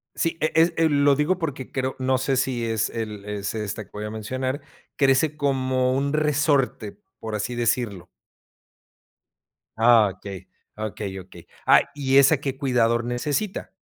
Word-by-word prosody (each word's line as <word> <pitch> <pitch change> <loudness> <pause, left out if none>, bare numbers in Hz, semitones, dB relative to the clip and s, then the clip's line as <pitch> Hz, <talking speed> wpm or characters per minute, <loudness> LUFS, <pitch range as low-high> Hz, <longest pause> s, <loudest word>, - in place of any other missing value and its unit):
Sí, 165 -1 -1
eh, 155 - +1
es, 165 +1 +4
eh, 165 -1 +3
lo 145 -1 +4
digo 150 +6 +1
porque 145 -6 -5
creo 130 0 -2
no 130 0 +1
sé 130 0 0
si 125 -2 0
es 110 -1 0
el 110 -3 -5
es 105 -1 -4
esta 110 0 -4
que - - -30
voy 105 +1 -5
a - - -4
mencionar, 130 +6 -3 0.3
crece 140 +2 +2
como 130 -2 +1
un 140 +2 0
resorte, 145 -7 +1 0.2
por 110 -1 -5
así 110 +4 -3
decirlo. 115 -6 -1 1.7
Ah, 115 -2 +6
okey, 95 -1 -9 0.3
okey, 105 -2 -5
okey. 90 -2 -15 0.2
Ah, - - +7
¿y 135 -2 +1
esa 140 +2 +6
qué 135 -1 -4
cuidador 120 -4 +1
necesita? 145 - -2
130 Hz, 155 wpm, -24 LUFS, 110-140 Hz, 1.7 s, Ah